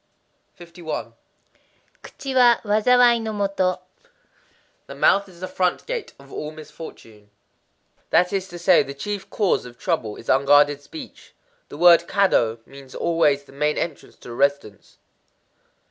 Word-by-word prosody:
51.—Kuchi 175 - -10
wa 245 -2 +6
wazawai 235 +3 +4
no 220 -1 -4
kado. 185 -2 -1 1.1
The - - -9
mouth 200 0 +3
is 175 -1 -17
the 185 - -4
front 180 -1 -1
gate 480 -2 -5
of 140 0 -16
all 150 - -5
misfortune. 150 -9 -12 0.8
That 180 +3 +2
is 190 -1 -2
to 175 - -9
say, 175 +1 +4
The 140 - -6
chief 200 +6 -5
cause 205 -4 0
of 120 0 -14
trouble 125 - -2
is 115 - -13
unguarded 145 +1 +4
speech. 280 - -12 0.3
The - - -9
word 170 -1 +6
Kado 115 - +1
means 135 -1 -14
always 150 -4 +1
the 140 - -19
main 150 +2 -1
entrance 165 -4 -5
to - - -12
a - - -7
residence. 140 -6 -2
170 Hz, 140 wpm, -22 LUFS, 140-195 Hz, 1.1 s, wa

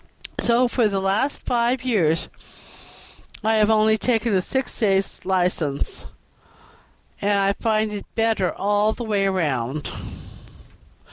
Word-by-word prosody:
So 240 +1 +3
for 240 -1 +2
the 200 -2 -1
last 195 +9 0
five 240 +1 0
years 175 -10 +1 1.2
I 220 +1 +2
have 215 0 +3
only 220 0 +3
taken 230 -2 +1
a 185 - +3
six 265 +7 -2
days' 195 -3 +1
license, 180 -6 -1 1.1
and 205 +1 +2
I 195 0 +2
find 215 -1 0
it 205 - -6
better 225 -5 +1
all 205 +2 +1
the 240 - -6
way 205 -3 +1
round." 145 -7 -1
210 Hz, 125 wpm, -22 LUFS, 190-225 Hz, 1.2 s, So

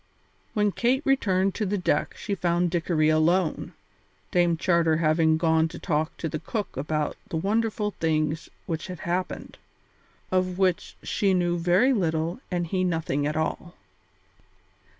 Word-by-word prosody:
When 210 -1 +2
Kate 250 +7 +1
returned 195 -8 +2
to 215 - -2
the 205 +2 0
deck 175 -5 0
she 205 - -3
found 175 -2 +1
Dickory 165 -2 +1
alone, 160 +3 +1 0.6
Dame 175 -2 +3
Charter 170 -2 +2
having 160 0 +3
gone 160 -1 +3
to 170 +1 -9
talk 155 -3 -1
to 165 - -3
the 155 0 -4
cook 210 +1 -4
about 150 +2 -2
the 160 - -2
wonderful 210 +3 0
things 155 0 0 0.2
which 165 +1 -4
had 180 -3 -7
happened, 180 +2 -3 0.7
of 185 -1 +1
which 185 -2 0
she 195 -2 +1
knew 175 -1 +1
very 180 +10 +4
little 165 -3 -1
and 175 -2 -1
he 185 +2 -1
nothing 160 -5 0
at 155 +1 -2
all. 170 +2 -3
175 Hz, 150 wpm, -26 LUFS, 160-190 Hz, 0.7 s, very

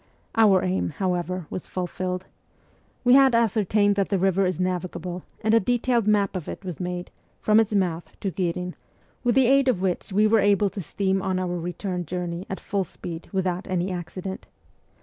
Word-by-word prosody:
Our 205 -5 +5
aim, 185 +1 0
how 185 -2 +1
ever, 180 0 -3
was 185 - -5
fulfilled. 185 0 -3 0.8
We 245 0 +5
had 270 -2 +6
ascertained 210 -2 +3
that 195 - +1
the 200 - +2
river 190 0 +2
is 180 -2 -2
navigable, 180 -1 -3 0.2
and 220 +1 +2
a 230 - +7
detailed 240 0 +1
map 205 -2 +2
of 180 -4 -4
it - - -7
was 180 -4 -5
made, 180 -1 -4 0.3
from 215 +1 +4
its 215 -1 +1
mouth 175 -4 0
to 195 - -1
Ghirin, 180 +1 -2 0.5
with 240 -2 +2
the 265 -1 +5
aid 270 +2 +4
of 245 -8 +2
which 185 -2 -1
w 210 +2 +3
r - - +4
e - - -3
were 225 - +6
able 200 0 +3
to 200 - -5
steam 190 +3 -1
on 190 -1 -1
our 180 -1 -1
return 180 0 -4
journey 175 +1 -4
at 190 - -4
full 200 -1 -1
speed 170 -1 -8
without 185 -1 -1
any 185 0 -1
accident. 185 +2 -6
190 Hz, 195 wpm, -25 LUFS, 180-205 Hz, 0.8 s, a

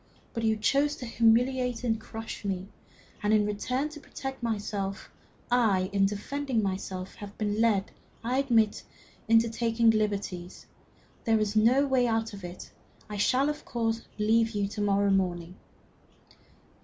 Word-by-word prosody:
But 230 - -3
you 220 -1 +2
chose 280 +7 +2
to 250 - -7
humiliate 245 +2 +2
and 225 -2 0
crush 225 -1 -7
me; 195 -2 -3 0.5
and 210 - +1
in 215 -1 +4
return, 250 +7 -1
to 305 0 -10
protect 270 -2 -7
myself, 205 -4 -3 0.4
I, 205 -6 +3
in 195 -1 +4
defending 235 +4 -2
myself, 190 -1 -4
have 205 -1 -10
been 210 0 0
led, 210 -4 +2 0.3
I 250 +3 +1
admit 235 -6 +4
it, - - -10 0.4
into 225 +1 +5
taking 230 0 +2
liberties. 200 -4 -2 0.6
There 225 -2 +3
is 210 0 -1
no 240 +6 +5
way 260 -3 +2
out 225 -1 0
of 200 -2 -9
it. 175 0 -8 0.4
I 210 - -4
shall, 255 +7 +3
of 300 0 -3
course, 225 -1 -1 0.2
leave 225 +2 +3
you 200 -1 +1
to 210 +1 -5
morrow 200 0 +2
morning." 180 -2 0
220 Hz, 155 wpm, -28 LUFS, 200-240 Hz, 0.6 s, into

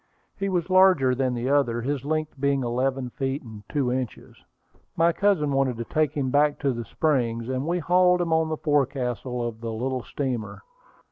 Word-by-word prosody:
He 195 0 -2
was 175 -3 0
larger 185 -9 +5
than 130 -1 0
the 120 +1 -2
other, 120 -5 +1
his 140 0 -2
length 155 -1 -2
being 140 -1 +1
eleven 125 +1 -1
feet 135 +2 -3
and 110 -3 -10
two 135 -5 0
inches. 125 -2 -4 0.6
My 170 +1 +3
cousin 185 -7 +2
wanted 135 -3 +1
to 115 - -3
take 155 +1 0
him 130 -3 -1
back 145 +1 +3
to 140 -2 +1
the 120 -1 -5
Springs, 120 -7 0
and 130 +3 -2
we 175 +1 +1
hauled 180 +2 +3
him 170 -2 0
on 160 0 +2
the 155 - -2
forecastle 130 -4 -1
of 115 -1 -8
the 115 -1 -4
little 130 +3 -2
steamer. 125 -4 -4
135 Hz, 190 wpm, -25 LUFS, 125-155 Hz, 0.6 s, larger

